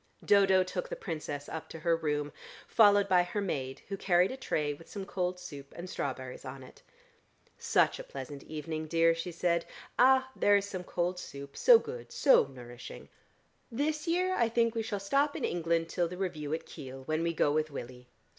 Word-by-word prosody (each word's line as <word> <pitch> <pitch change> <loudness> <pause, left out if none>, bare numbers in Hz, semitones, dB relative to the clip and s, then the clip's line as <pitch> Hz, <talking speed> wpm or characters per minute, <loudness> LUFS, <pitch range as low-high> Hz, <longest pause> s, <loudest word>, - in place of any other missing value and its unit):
Dodo 195 -2 +5
took - - -4
the - - -3
Princess 150 - -5
up 160 - -6
to - - -8
her 170 0 +3
room, 150 -2 -1 0.4
followed 205 -2 +5
by 180 -1 +5
her 175 +4 -3
maid 135 -9 -3
who 200 - -3
carried 180 +1 +3
a - - -4
tray 150 - -1
with 165 +3 -14
some 200 -3 -6
cold 180 -2 -2
soup 140 -5 -10
and 175 +2 -6
strawberries 130 -6 -5
on 130 0 -8
it. 130 - -15 0.8
"Such - - +2
a - - -5
pleasant 150 - -8
evening, 155 0 -5
dear," 165 +1 +4
she 165 +2 -4
said. 170 0 +1 0.4
"Ah, 260 +1 +5
there 205 - +4
is 200 0 +2
some 185 -3 -5
cold 180 +1 -1
soup: 140 -4 -9
so - - +8
good, 470 +1 -7
so 275 - +5
nourishing. 125 -2 -10 0.6
This 300 +6 -1
year 365 +2 +2
I 235 -9 +2
think 230 0 +2
we 230 - -1
shall 215 -2 -3
stop 275 +9 +1
in - - -1
England 165 -1 0
till 175 0 0
the 180 +2 -7
review 155 -6 -3
at 160 - -2
Kiel, 135 -3 -9
when 155 +3 -1
we 170 0 +1
go 150 -3 +2
with 155 +1 +1
Willie. 125 -3 -8
175 Hz, 195 wpm, -31 LUFS, 150-205 Hz, 0.8 s, so